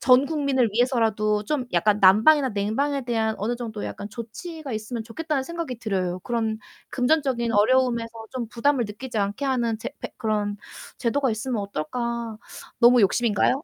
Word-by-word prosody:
전 255 +1 +5
국민을 280 -6 +1
위해서라도 220 -3 +1
좀 265 +2 -1
약간 205 +4 +3
난방이나 250 +9 +6
냉방에 245 +7 -1
대한 220 -2 0
어느 235 +4 -1
정도 220 -3 -5
약간 205 - -6
조치가 270 - -7
있으면 220 +2 -4
좋겠다는 280 +5 -2
생각이 330 -7 -5
들어요. 185 -5 -1
그런 225 +1 -2 0.3
금전적인 255 -3 +1
어려움에서 235 +2 +3 0.3
좀 240 -3 -3
부담을 245 +2 +1
느끼지 225 +4 -7
않게 205 +7 -1
하는 235 -4 0
제 - - -4
패 - - -6
그런 210 -3 -1 0.4
제도가 265 +2 +1
있으면 225 +1 -2
어떨까? 230 +6 -3 0.4
너무 240 +1 +6
욕심인가요? 230 +5 +2
235 Hz, 375 characters per minute, -24 LUFS, 215-260 Hz, 0.4 s, 난방이나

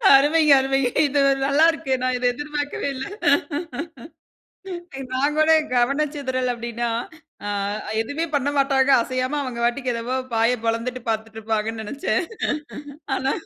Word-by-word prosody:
அருமை, 295 +4 +4 0.2
அருமைங்க! 270 -1 +1 0.2
இது 285 0 +1 0.2
நல்லா 285 +4 +4
இருக்கு. 270 -4 -3
நான் 255 0 +1
இத 250 - -3
எதிர்பார்க்கவே 295 +1 -3
இல்ல. 260 - -4 2.1
நான் 285 +3 +1
கூட 310 +1 +5 0.2
கவன 275 +5 +2
சிதறல் 255 -3 -1
அப்பிடின்னா, 235 0 -3 0.6
ஆ - - -3 0.5
எதுமே 285 +8 -2
பண்ணமாட்டாங்க 275 -1 +2
அசையாம 255 +3 -1
அவங்க 250 -3 -5
பாட்டுக்கு 250 +1 0
என்னமோ 235 +3 -2 0.2
வாய 230 +2 +3
பொளந்துட்டு 230 +2 -1
பார்த்துட்டு 220 0 -3
இருப்பாங்கன்னு 220 0 -2
நெனைச்சேன். 285 - -1 0.9
ஆனா 270 +1 0
260 Hz, 120 wpm, -23 LUFS, 235-285 Hz, 2.1 s, கூட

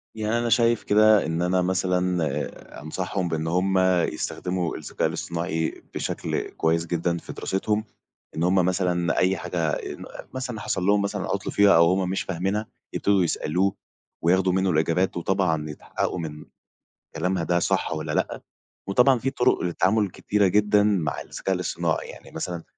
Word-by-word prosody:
يعني 110 +1 0
أنا 120 0 -1
شايف 115 0 +3
كده 105 0 +5
إن 80 +2 -1
أنا 90 +1 +2
مثلًا 90 -5 -1
أنصحهم 90 +4 -3
بإن 80 0 -2
هم 95 +2 +2 0.3
يستخدموا 90 -2 -3
الذكاء 75 - -2
الاصطناعي 85 -1 -3
بشكل - - -3
كويّس 80 +1 0
جدًا 85 0 -1
في - - -8
دراستهم. 105 +3 -1 0.5
إن 80 - -1
همّ 90 +2 +3
مثلًا 90 -2 +1
أي 95 +1 +3
حاجة 90 - -5
آآ - - -3
ن - - -10 0.3
مثلًا 130 -4 -4
حصل 95 -2 -2
لهم 100 0 +4
مثلًا 100 - -2
عطل - - -2
فيها 100 -1 +5
أو 85 0 +7
هم 95 -1 0
مش 95 - -1
فاهمينها 95 +4 -2 0.3
يبتدوا 100 -2 +2
يسألوه، 90 +4 0 0.5
وياخدوا 95 +2 +3
منّه 95 0 +2
الإجابات 85 +4 +1
وطبعًا 85 -4 0
يتحققوا 75 +4 -3
من 75 -2 -6 0.7
كلامها 90 +2 0
ده 85 +1 +1
صح - - 0
والّا 80 0 -4
لأ، - - -1 0.5
وطبعًا 125 +5 +4
في 135 - 0
طرق 130 -1 +2
للتعامل 95 +4 +1
كتيرة 100 +2 +1
جدًا 105 +1 +3
مع 90 -9 0
الذكاء 95 -1 -3
الاصطناعي، 85 -2 -2
يعني - - -12
مثلًا 85 -2 -4
90 Hz, 155 wpm, -25 LUFS, 85-100 Hz, 0.7 s, أو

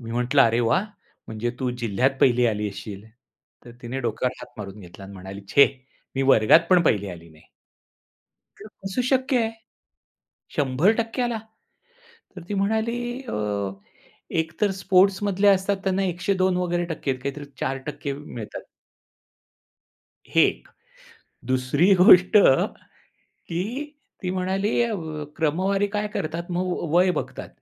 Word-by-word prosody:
मी 115 -1 -8
म्हटलं, 125 +3 +3
"अरे 115 +1 +3
वाह! 150 - +2 0.4
म्हणजे 110 +2 -3
तू 125 -1 0
जिल्ह्यात 115 +5 +2
1ली 125 -1 +4
आली 105 -1 -1
असशील." 100 +1 -9 0.6
तर 120 - -12
तिने 125 +3 -4
डोक्यावर 120 +1 -1
हात - - -11
मारून 100 0 -8
घेतला 90 +2 -12
आणि 100 - -11
म्हणाली, 95 +2 -9
"छे! 140 - +7 0.5
मी 135 - 0
वर्गात 110 +9 +6
पण 180 -2 +6
पहिली 100 - +1
आली 85 -1 -11
नाही." 80 0 -19 1.2
"हे 205 - -12 0.2
कस 195 +5 -5
शक्य 265 0 +2
आहे? 225 - -1 1.1
100% 200 - +1
आला?" 240 -2 0 1.0
तर 180 - -9
ती - - -2
म्हणाली 220 +3 0 0.3
अ, 255 - -7 1.1
एकतर 165 +6 -1
स्पोर्ट्समधले 195 +1 +3
असतात 195 0 +3
त्यांना 195 0 0
102 185 +1 0
वगैरे 175 -1 -1
टक्के 140 -2 -2
आहेत 130 -1 -5
काहीतरी 140 +1 -4
4% 140 +1 -4
मिळतात. 120 -7 -8 1.7
हे - - +6
एक. - - -5 0.8
दुसरी 130 +9 +2
गोष्ट, 180 -1 +7 1.0
की 240 - -5 0.3
ती 180 - -2
म्हणाली 190 +4 0
अ, 235 -1 -1
व 155 -4 -5
क्रमवारी 190 +6 +1
काय 210 0 -1
करतात 170 -3 -4
मग 180 +1 -1
व 170 - -3
वय 180 +1 +5
बघतात, - - -8
165 Hz, 135 wpm, -24 LUFS, 125-195 Hz, 1.7 s, छे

